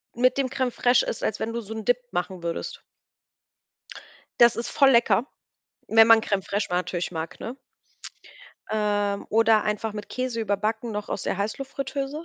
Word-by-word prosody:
mit 255 +3 +3
dem 275 - +1
Crème 255 -1 -1
fraîche 245 +1 +3
isst, - - -4
als - - -1
wenn 230 +1 -3
du 235 - -3
so 220 0 -8
'n 220 -1 -6
Dip 245 - +3
machen 180 0 -3
würdest. 170 0 -4 1.6
Das 235 -1 +7
ist 235 - -4
voll 275 -2 +5
lecker, 235 +1 +3 0.6
wenn 225 0 +7
man 225 -1 +7
Crème 200 -3 -1
fraîche 200 +1 -1
ma 180 - -1
natürlich 180 -1 -2
mag, 160 -1 -6
ne? 245 +4 -6 1.1
Ähm, 205 -2 0
oder 225 -1 +4
einfach 215 +1 -2
mit 210 -1 -7
Käse 255 -2 -3
überbacken 215 +2 -1
noch 210 0 -5
aus - - -3
der - - -2
Heißluftfritteuse. 275 +6 -4
220 Hz, 170 wpm, -25 LUFS, 205-245 Hz, 1.6 s, Das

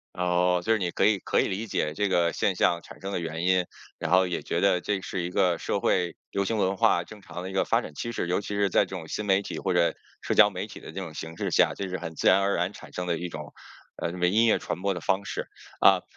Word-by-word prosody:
哦， 90 0 +2
就 115 - +2
是 110 - +3
你 90 -3 -1
可 - - 0
以 105 -2 +3
可 - - +1
以 - - +1
理 105 +4 -3
解 75 -4 -1
这 100 -1 0
个 85 -2 +2
现 95 -3 0
象 85 -1 +2
产 - - -13
生 95 +1 -5
的 90 - -1
原 80 +1 -4
因， 90 0 +3 0.3
然 - - -3
后 95 0 +5
也 90 -2 -3
觉 85 - -1
得 95 -3 +3
这 100 0 -1
是 95 -1 -4
一 90 - -3
个 90 -2 +2
社 - - -2
会 90 -1 +1 0.2
流 100 0 0
行 110 +3 -1
文 95 0 +1
化， 85 -1 +3
正 105 -2 -13
常 90 - -7
的 95 - -5
一 - - -8
个 95 - +1
发 - - +2
展 75 - -9
趋 115 - -4
势。 110 - -2
尤 90 +3 0
其 105 - -9
是 100 -1 +2
在 - - +4
这 95 - -7
种 80 -3 -7
新 105 - -4
媒 95 -1 +3
体 100 - -6
或 95 - 0
者 85 -1 +3 0.3
社 - - -1
交 - - +7
媒 - - -4
体 - - -11
的 - - -9
这 95 - -6
种 85 -5 -7
形 80 +1 -7
势 - - -2
下， - - +4
这 100 - -4
是 90 - -3
很 80 -1 -7
自 - - -2
然 95 - +6
而 100 0 +1
然 90 +3 -1
产 - - -13
生 90 0 -4
的 85 -2 0
一 90 - -4
种， 75 -2 -8 0.5
呃， 85 - 0 0.2
音 110 +5 +4
乐 110 - +4
传 90 - -5
播 100 -1 +1
的 90 - -5
方 95 +4 0
式。 - - -4 0.3
啊， - - +6
90 Hz, 315 characters per minute, -27 LUFS, 85-100 Hz, 0.5 s, 交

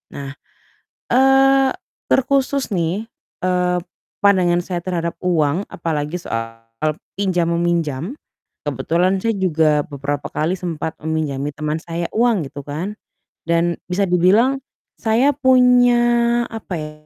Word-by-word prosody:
Nah, 140 -1 -6 0.8
eee, 270 +1 +5 0.4
terkhusus 270 -1 +1
nih, 180 +3 -1 0.4
eee, 180 -1 +1 0.5
pandangan 180 -3 +4
saya 175 -1 -3
terhadap 170 -1 -2
uang 170 0 +1
apalagi 155 -1 -3
soal 115 -8 -5 0.6
pinjam 180 -4 +1
meminjam. 170 - -1 0.5
Kebetulan 185 +3 0
saya 225 +1 0
juga 160 -5 +2
beberapa 145 -2 -4
kali 165 +5 0
sempat 165 -3 -4
meminjami 150 -3 -2
teman 150 +1 -2
saya 170 +1 -4
uang 225 - +2
gitu 145 0 -9
kan, 165 +9 -5 0.5
dan 170 +1 +1
bisa 185 +2 0
dibilang 195 +9 +3 0.4
saya 235 +5 +3
punya, 245 -2 +4
apa 220 -5 -6
ya, 150 0 -6
180 Hz, 115 wpm, -20 LUFS, 160-225 Hz, 0.8 s, eee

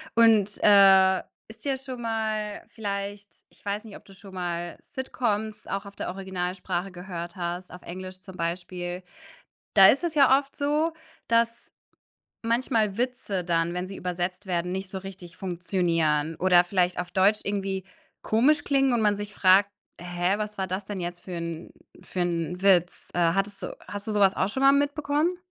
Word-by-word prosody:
und, 220 -3 +5
äh, 190 -2 +7 0.3
ist 220 +3 -14
dir 275 -2 0
schon 260 -2 -8
mal 220 -2 -2
vielleicht 200 -1 -4 0.2
ich - - -25
weiß 205 +2 -2
nicht, 220 -3 -10
ob - - -20
du 195 - -15
schon 195 0 -14
mal 175 -2 -4
Sitcoms 220 -5 -3
auch 195 +1 -3
auf 200 - -12
der - - -4
Originalsprache 185 0 -3
gehört 175 0 -7
hast, 175 0 -4
auf 180 - -10
Englisch 185 +1 -8
zum 190 -1 -12
Beispiel. 175 +1 -4 0.7
Da 195 -2 +9
ist 275 - +3
es 335 -2 -1
ja 275 -2 +6
oft 275 0 -8
so, 300 +3 +1 0.3
dass 230 0 0 0.7
manchmal 230 -3 +1
Witze 240 -7 -2
dann, 170 0 0
wenn 180 +1 -3
sie 195 - -8
übersetzt 180 +2 -3
werden, 180 -1 -1
nicht 190 0 -4
so 190 - -4
richtig 185 -2 -10
funktionieren 165 -4 0
oder 180 0 +5
vielleicht 180 -1 +1
auf 180 0 -3
Deutsch 200 +3 +3
irgendwie 195 -1 -2 0.4
komisch 285 +7 +3
klingen 270 -2 +2
und 235 - +2
man 210 -1 +3
sich 205 0 -6
fragt: 195 +1 +5 0.3
„Hä, 175 +2 0
was 210 -1 -5
war 190 - -1
das 185 +2 -3
denn 200 -1 -5
jetzt 175 0 -5
für 185 - -9
'n 170 -1 -5 0.3
für 185 - -6
'n 175 0 -2
Witz?“ 180 -3 +3
Äh, 170 -1 +3
hattest 195 +1 -2
du - - -5
hast 205 0 -6
du 220 - -3
so 210 - 0
was 195 -1 +5
auch 190 - +1
schon 265 +6 -3
mal 275 0 +7
mitbekommen? 290 +4 +1
195 Hz, 180 wpm, -26 LUFS, 180-220 Hz, 0.7 s, Da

